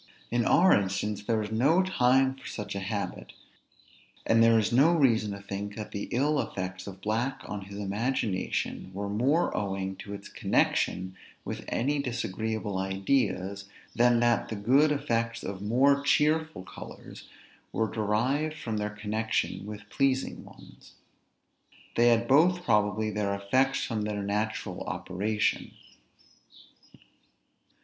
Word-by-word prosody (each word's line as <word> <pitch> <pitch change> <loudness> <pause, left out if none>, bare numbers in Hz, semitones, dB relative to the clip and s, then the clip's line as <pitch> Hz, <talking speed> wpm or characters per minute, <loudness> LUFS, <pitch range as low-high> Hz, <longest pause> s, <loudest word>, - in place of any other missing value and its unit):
In 120 -1 +1
our 190 +2 +5
instance, 100 +1 0
there 115 +1 0
was 105 0 -3
no 145 +12 +3
time 130 -6 +3
for 135 - -12
such 105 - -5
a 100 - -3
habit; 100 -1 -4 0.9
and 115 0 +4
there 115 0 +6
is 105 -4 +1
no 145 +8 +5
reason 115 -8 +3
to 100 - -7
think 100 +1 -5
that 105 -1 -6
the 100 - -5
ill 145 +4 +1
effects 95 0 -5
of 95 -1 -9
black 120 +6 -1
on 100 -2 -6
his 100 0 -9
imagination 105 -2 -2
were 100 +1 -3
more 130 +11 +1
owing 95 -1 -2
to 100 +1 -7
its 100 - -10
connection 95 +1 0 0.3
with - - -5
any 145 +5 0
disagreeable 110 -5 -2
ideas, 95 0 -1 0.3
than 120 0 +4
that 120 -1 +2
the 110 - -3
good 135 +9 +4
effects 115 -5 -1
of 95 0 -5
more 135 +7 +3
cheerful 155 - +1
colors 85 -4 -11 0.4
were 110 - 0
derived 120 +9 0
from 110 -2 -3
their 105 0 -1
connection 105 -1 -2
with 105 0 -8
pleasing 135 -1 0
ones. - - -16 1.0
They 120 +1 +4
had 120 0 +3
both 175 +7 +4
probably 105 - +1
their 100 -1 -1
effects 130 +7 +1
from 110 -2 -2
their 105 -1 -2
natural 105 +2 -2
operation. 105 +4 -1
110 Hz, 140 wpm, -28 LUFS, 100-130 Hz, 1.0 s, there